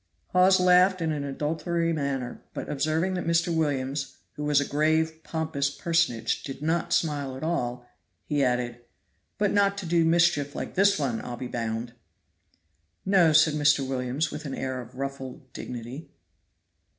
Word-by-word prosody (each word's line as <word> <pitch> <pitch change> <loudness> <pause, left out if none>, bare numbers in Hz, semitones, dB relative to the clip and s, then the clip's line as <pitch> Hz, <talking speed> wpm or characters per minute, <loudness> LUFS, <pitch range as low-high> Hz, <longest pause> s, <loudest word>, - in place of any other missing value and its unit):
Hawes 185 +1 +5
laughed 180 +1 +5
in 165 -2 0
an 150 -2 -2
adulatory 165 +4 -1
manner, 140 -5 -3
but - - -5
observing 155 +6 0
that 180 -2 -3
Mr. 170 0 +2
Williams, 140 -3 -1 0.2
who 150 - -6
was 150 -1 +3
a 145 - 0
grave, 160 +2 +1
pompous 160 -4 -1
personage, 140 -8 0
did 135 -2 -7
not 165 +1 0
smile 145 -4 0
at 135 - -8
all, 125 -7 -2 0.4
he 145 -2 +1
added: 125 -1 0 0.6
"But 205 -1 +1
not 200 -1 +2
to 195 - -5
do 170 0 +3
mischief 165 -3 +2
like - - -5
this 200 +1 +4
one, 125 -6 -1
I'll 120 -1 -6
be 125 - -5
bound." 115 0 -3 1.1
"No," 185 -4 +5
said 155 0 +5
Mr. 145 -2 +3
Williams, 130 +4 -1
with 150 +1 -7
an 135 - -4
air 130 -1 -3
of 120 +1 -13
ruffled 135 -1 -6
dignity. 125 +5 -7
150 Hz, 160 wpm, -27 LUFS, 130-165 Hz, 1.1 s, Hawes